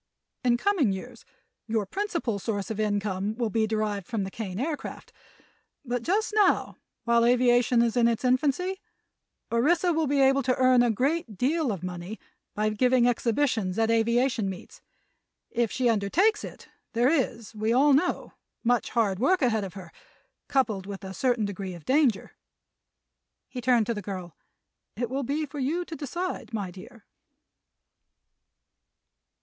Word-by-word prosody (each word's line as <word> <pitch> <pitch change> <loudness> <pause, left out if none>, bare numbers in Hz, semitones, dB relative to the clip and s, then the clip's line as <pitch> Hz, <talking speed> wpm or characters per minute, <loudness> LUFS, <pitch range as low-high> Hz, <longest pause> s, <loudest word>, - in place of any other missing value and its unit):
In 240 -1 +3
coming 320 - +2
years 230 +5 -7 0.4
your 220 -2 0
principal 335 - -2
source 205 0 -3
of 215 - -4
income 205 -1 -1
will 230 -2 -2
be 220 0 +1
derived 210 -3 -2
from 225 -4 -2
the 190 - -5
Kane 195 -3 -5
Aircraft; 295 +3 -5 0.7
but 245 -1 -2
just 415 - 0
now, 415 -3 +2 0.3
while 235 -1 +3
aviation 245 0 +4
is 235 0 0
in 240 -1 +4
its 235 +2 -1
infancy, 295 +9 +1 0.7
Orissa 335 +9 +2
will 320 -1 +1
be 280 +1 +1
able 270 0 +4
to 255 -1 +1
earn 255 -1 +4
a 240 - +3
great 255 - -1
deal 290 - +1
of 185 -4 -5
money 180 +4 -6 0.4
by 215 +1 +1
giving 250 +3 +3
exhibitions 230 -5 0
at 225 0 +2
aviation 235 -1 +2
meets. 185 -2 -10 0.7
If 235 -2 0
she 250 0 0
undertakes 295 - +2
it - - -10 0.3
there 240 +2 +3
is, 235 -8 -1
we 215 +1 -1
all 275 +4 +5
know, 295 +7 0 0.3
much 245 0 +1
hard 205 -5 0
work 290 +6 +2
ahead 220 -4 +2
of 195 0 -7
her, 180 -4 -10 0.6
coupled 220 -9 0
with 200 -1 -7
a 190 0 -6
certain 240 +1 +1
degree 195 -2 -5
of 170 - -13
danger." 265 -6 +2 1.2
He 250 - -7
turned 240 -2 +3
to 235 - -1
the 210 - -5
girl. 185 -4 -7 0.6
"It 240 +1 -3
will 270 +1 -1
be 290 +4 -1
for 290 0 -8
you 320 +7 -1
to 330 - -7
decide, 320 -3 -4
my 200 -4 -3
dear." 215 +5 -13
235 Hz, 155 wpm, -27 LUFS, 210-270 Hz, 1.2 s, all